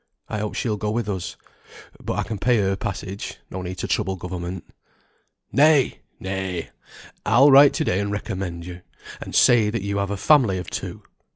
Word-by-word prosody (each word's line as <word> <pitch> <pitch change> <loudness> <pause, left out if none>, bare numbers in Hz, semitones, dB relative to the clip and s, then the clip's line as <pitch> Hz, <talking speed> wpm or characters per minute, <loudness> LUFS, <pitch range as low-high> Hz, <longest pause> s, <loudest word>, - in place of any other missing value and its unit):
I 110 - -3
hope 105 0 -4
she'll 110 -4 -1
go 105 +1 -2
with 110 0 -1
us. 95 -4 -4 0.7
But - - -2
I - - +1
can 110 -3 -5
pay 125 +3 +3
her 95 -2 +1
passage; 95 +1 -5
no 95 - -5
need 90 0 -5
to - - -3
trouble 95 -3 0
government." 90 0 -6 0.9
"Nay, 145 -2 +4 0.2
nay! 95 -3 -4 0.5
I'll 130 +7 +5
write 140 +1 +8
to - - 0
day 90 - 0
and 100 0 -2
recommend 95 -4 -4
you; 90 0 -9 0.4
and - - -7
say 115 -4 +5
that 110 -2 -3
you 100 0 -2
have 100 0 -1
a 100 - -2
family 120 -6 +4
of 90 - -6
two. - - -6
100 Hz, 185 wpm, -23 LUFS, 95-110 Hz, 0.9 s, write